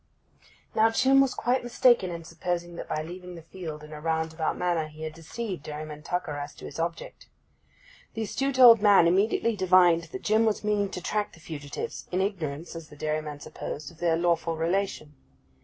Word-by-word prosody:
Now 220 +1 +4
Jim 265 +4 +4
was 270 -2 +1
quite 250 +1 0
mistaken 240 -4 +3
in 170 -1 -6
supposing 175 +1 -4
that - - -7
by 155 - -1
leaving 180 +2 -9
the 165 - -10
field 160 -3 -8
in 150 0 -10
a 150 - -8
roundabout 160 0 -1
manner 175 -3 0
he 155 +1 -11
had 155 0 -4
deceived 180 +3 -6
Dairyman 150 0 -7
Tucker 155 -3 -3
as 145 0 -7
to - - -11
his - - -8
object. 170 0 -4 0.9
That 225 - -3
astute 270 +5 -1
old 235 -4 +9
man 205 -5 +6
immediately 205 +5 +2
divined 180 -3 +4
that 180 +4 -8
Jim 215 +1 +3
was 220 -1 0
meaning 205 -1 +1
to 180 - -6
track 210 +3 -2
the - - -15
fugitives, 145 -3 -6
in 180 - 0
ignorance 170 -5 -3
(as 165 -1 -8
the - - -13
dairyman 150 -1 -3
supposed) 145 +1 -7
of 165 - -20
their 170 -2 +2
lawful 165 -1 +1
relation. 165 -2 -1
170 Hz, 190 wpm, -27 LUFS, 155-200 Hz, 0.9 s, old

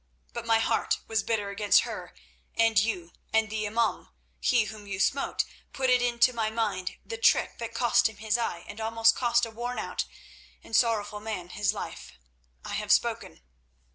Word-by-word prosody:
But 235 -1 -5
my 225 0 +5
heart 225 - +1
was 220 -1 +1
bitter 205 -2 -1
against 205 0 +4
her - - -7 0.4
and 225 -1 +4
you, 185 -6 -2 0.2
and 220 -1 +2
the 215 -1 -1
imaum, 225 +2 0 0.3
he 245 -3 +3
whom 210 -1 -9
you 195 -1 -4
smote, 275 +8 +1 0.3
put 260 -1 +1
into 245 0 +3
my 225 -2 0
mind 215 -5 -2
the 460 -1 -6
trick - - +3
that 230 -1 -5
cost 240 -2 +3
him 220 - -14
his 215 0 0
eye 200 -8 -2
and 205 +2 -8
almost 225 0 +3
cost 240 -1 +2
a 230 - -9
worn 240 +2 -4
out - - -2 0.6
and 225 - -4
sorrowful 210 -3 +2
man 210 -5 -5
his 205 +2 0
life. - - -7 0.5
I - - -5
have - - -1
spoken." - - +1
225 Hz, 175 wpm, -28 LUFS, 210-235 Hz, 0.6 s, my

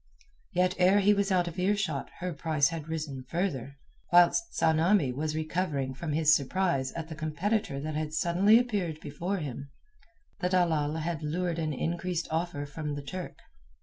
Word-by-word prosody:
Yet 180 -1 +2
ere 185 +3 +5
he 205 +1 +5
was 200 0 0
out 180 -2 +2
of 170 +1 -5
earshot 185 -6 0
her 180 -1 -2
price 155 -2 +1
had 165 -2 -6
risen 155 -5 -4
further. 140 -7 -2 0.3
Whilst 175 - +5
Tsamanni 160 -1 +3
was 155 +3 -2
recovering 155 -4 -1
from 150 +3 -4
his 155 0 +5
surprise 140 -2 0
at 165 -1 -5
the 160 - -7
competitor 155 +2 -1
that 155 +2 -4
had 155 0 -2
suddenly 175 +7 +4
appeared 200 -10 -1
before 170 +7 -3
him, 140 -4 -6 0.7
the 180 -2 0
dalal 160 -5 +2
had 160 0 -3
lured 170 +2 -2
an 155 -1 -1
increased 170 +4 -2
offer 160 -3 -2
from 150 0 -5
the 145 - -6
Turk. 180 +5 -6
165 Hz, 165 wpm, -29 LUFS, 150-180 Hz, 0.7 s, ere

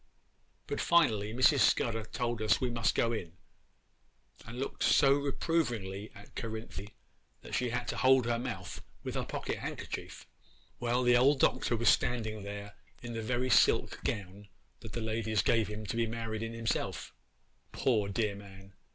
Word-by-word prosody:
'But, - - -3
finally, 110 -12 +3
Mrs. 130 +4 +4
Scudder 115 -3 +2
told 120 0 -3
us 105 -3 +3
we 125 -2 -1
must 115 -2 +1
go 115 - +2
in, 85 -7 -5 1.1
and 115 +2 -8
looked 135 - -4
so 135 0 +5
reprovingly 120 - -1
at 100 +1 -14
Cerinthy 110 -2 -6 0.5
that - - -10
she 125 -1 +1
had 120 +1 -2
to - - -3
hold 130 -1 +5
her 120 0 0
mouth 110 -8 -5 0.2
with - - -4
her - - -1
pocket - - -4
handkerchief. - - -6 0.5
'Well, 120 +1 +1
the 125 0 +5
old 135 +3 +4
Doctor 120 - +2
was 115 - +4
standing 110 -3 +1
there 100 0 -7 0.3
in 120 -1 -5
the 115 - -3
very 125 +3 -1
silk - - +4
gown 100 -1 -4 0.3
that 115 -3 -10
the 115 - -3
ladies 110 -1 0
gave 115 -2 +3
him 105 +1 -6
to 105 - -4
be 115 0 +1
married 110 -1 -4
in 115 0 -4
himself, 115 0 -2 0.6
poor, 110 -6 +1
dear 105 0 0
man! 95 -1 -13
115 Hz, 165 wpm, -31 LUFS, 105-120 Hz, 1.1 s, so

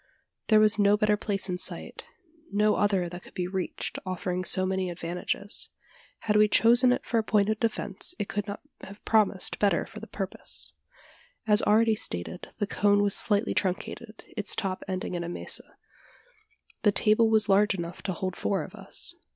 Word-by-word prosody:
There 215 -1 +5
was 215 0 +4
no 205 0 +4
better 210 0 +2
place 200 -1 -2
in 180 -1 -3
sight - - -4 0.5
no 210 +1 +3
other 195 -4 +1
that 175 +1 -8
could - - -17
be 180 - -2
reached, 185 0 -4
offering 185 -1 -3
so 185 0 +2
many 190 -1 -1
advantages. 175 +4 -4 0.5
Had 210 -1 +1
we 210 0 +6
chosen 240 +4 +4
it 250 - -1
for 230 - +1
a - - -1
point 210 -1 +2
of 215 0 -1
defence, 220 - 0
it 200 - -3
could 205 0 -3
not 205 +1 -6 0.2
have 200 +2 -12
promised 215 -4 +1
better 205 -1 +2
for - - -11
the - - -10
purpose. - - -3 0.7
As 210 -1 +5
already 220 +1 +3
stated, 90 - -2
the 205 - -1
cone 205 0 +2
was 200 -1 +4
slightly 210 +1 +5
truncated 215 +3 -4
its 210 -2 -1
top 190 -2 -3
ending 185 -1 -4
in 175 -1 -3
a 170 - -5
mesa. - - -4 1.0
The 205 - +4
table 215 +3 +3
was 220 -1 +3
large 200 +1 +3
enough 170 -1 -6
to 190 - -3
hold 185 +1 -4
four 195 - -1
of - - -11
us. - - -3
205 Hz, 185 wpm, -27 LUFS, 185-215 Hz, 1.0 s, we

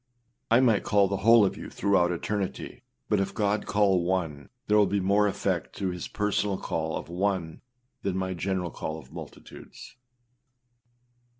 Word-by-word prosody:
â 115 - +6
I - - +5
might 115 -6 +3
call 100 -1 +3
the 100 0 -2
whole 115 +2 +6
of 95 - -1
you - - -8
throughout 95 -3 +2
eternity, 95 +3 -4 0.3
but 105 - +2
if 95 - -2
God 105 0 0
call 100 -3 +3
one, 85 -6 -2 0.2
there 105 - +2
will 105 -1 +5
be 100 - 0
more 100 +2 +3
effect 100 - -2
through 95 -2 -2
his 90 -1 -5
personal 105 -1 -1
call 80 -2 -3
of - - -7
one 90 -2 -2 0.4
than 95 -2 -2
my 95 0 -2
general 90 -1 -2
call 80 - -5
of 80 - -13
multitudes. - - -11
95 Hz, 170 wpm, -27 LUFS, 90-105 Hz, 0.4 s, â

